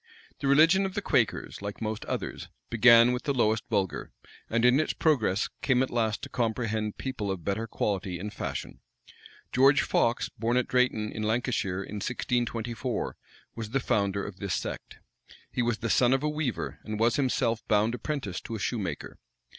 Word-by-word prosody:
The 140 Hz, -, -2 dB
religion 160 Hz, +8 st, +6 dB
of 190 Hz, -, -9 dB
the -, -, -1 dB
Quakers, -, -, 0 dB
like 100 Hz, 0 st, -5 dB
most 110 Hz, -1 st, -3 dB
others, -, -, -4 dB, 0.2 s
began 115 Hz, +1 st, +7 dB
with 125 Hz, 0 st, -1 dB
the 140 Hz, -, 0 dB
lowest 110 Hz, -2 st, +2 dB
vulgar, 100 Hz, -5 st, -1 dB, 0.4 s
and, 115 Hz, +1 st, +2 dB
in 125 Hz, +3 st, +5 dB
its 155 Hz, -, 0 dB
progress, 110 Hz, -, +2 dB
came 130 Hz, -2 st, +3 dB
at 130 Hz, -, -4 dB
last 110 Hz, -3 st, 0 dB
to -, -, -4 dB
comprehend 110 Hz, -3 st, -1 dB
people 130 Hz, -7 st, -4 dB
of 95 Hz, -3 st, -4 dB
better 105 Hz, +3 st, -1 dB
quality 95 Hz, -4 st, -2 dB
and 105 Hz, +4 st, -6 dB
fashion. -, -, -5 dB, 0.7 s
George 135 Hz, +2 st, +5 dB
Fox, 115 Hz, +2 st, +1 dB
born 115 Hz, +3 st, -1 dB
at 125 Hz, -, +1 dB
Drayton, 125 Hz, -4 st, +1 dB
in 110 Hz, -, -5 dB
Lancashire, 110 Hz, -4 st, -1 dB
in 105 Hz, -, -7 dB
1624, 120 Hz, 0 st, -2 dB, 0.4 s
was 115 Hz, -2 st, -6 dB
the 135 Hz, +4 st, +1 dB
founder 100 Hz, -5 st, 0 dB
of 100 Hz, -3 st, -8 dB
this 100 Hz, -3 st, -2 dB
sect. -, -, -5 dB, 0.5 s
He -, -, -1 dB
was 120 Hz, -2 st, 0 dB
the 115 Hz, -, -3 dB
son 125 Hz, 0 st, +4 dB
of 135 Hz, +1 st, +1 dB
a 150 Hz, -, +1 dB
weaver, 150 Hz, -5 st, -3 dB
and 110 Hz, -1 st, -5 dB
was 115 Hz, +5 st, +3 dB
himself 125 Hz, -4 st, +1 dB
bound 110 Hz, +1 st, +3 dB
apprentice 125 Hz, -, -3 dB
to 115 Hz, -, -6 dB
a -, -, -5 dB
shoemaker. 95 Hz, -2 st, -3 dB
115 Hz, 180 wpm, -28 LUFS, 105-125 Hz, 0.7 s, began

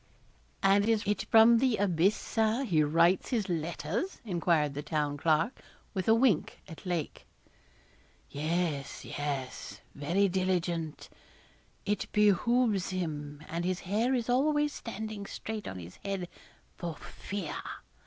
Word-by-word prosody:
'And 200 Hz, +2 st, +4 dB
is 220 Hz, -2 st, +2 dB
it 205 Hz, +1 st, 0 dB
from 225 Hz, +1 st, +7 dB
the 250 Hz, -3 st, +2 dB
abyss, 190 Hz, 0 st, +3 dB
Sir, 225 Hz, +3 st, 0 dB
he 175 Hz, -, +2 dB
writes 165 Hz, +5 st, +3 dB
his 225 Hz, -6 st, 0 dB
letters?' 170 Hz, -, -2 dB
enquired 170 Hz, -6 st, +1 dB
the 145 Hz, -, -4 dB
Town 150 Hz, -1 st, -1 dB
Clerk, 160 Hz, -, +1 dB, 0.3 s
with 190 Hz, -3 st, -2 dB
a 225 Hz, -, +6 dB
wink 230 Hz, -8 st, +2 dB
at 165 Hz, +3 st, -10 dB
Lake. 170 Hz, -4 st, -3 dB, 1.0 s
'Yes, 155 Hz, -1 st, -2 dB
yes, 140 Hz, -3 st, -4 dB
very 170 Hz, +8 st, +1 dB
diligent; 175 Hz, -4 st, -1 dB, 0.8 s
it 205 Hz, -1 st, -1 dB
behoves 210 Hz, 0 st, +3 dB
him; 150 Hz, -5 st, -4 dB
and 170 Hz, +1 st, -3 dB
his 185 Hz, +1 st, -1 dB
hair 225 Hz, +8 st, +1 dB
is 235 Hz, -3 st, -1 dB
always 295 Hz, +4 st, +2 dB
standing 215 Hz, -2 st, -6 dB
straight 220 Hz, -1 st, -5 dB
on 95 Hz, -, -5 dB
his 85 Hz, 0 st, -10 dB
head 195 Hz, -3 st, -4 dB, 0.5 s
for 170 Hz, -3 st, -5 dB
fear. 195 Hz, -6 st, -6 dB
185 Hz, 130 wpm, -30 LUFS, 160-220 Hz, 1.0 s, from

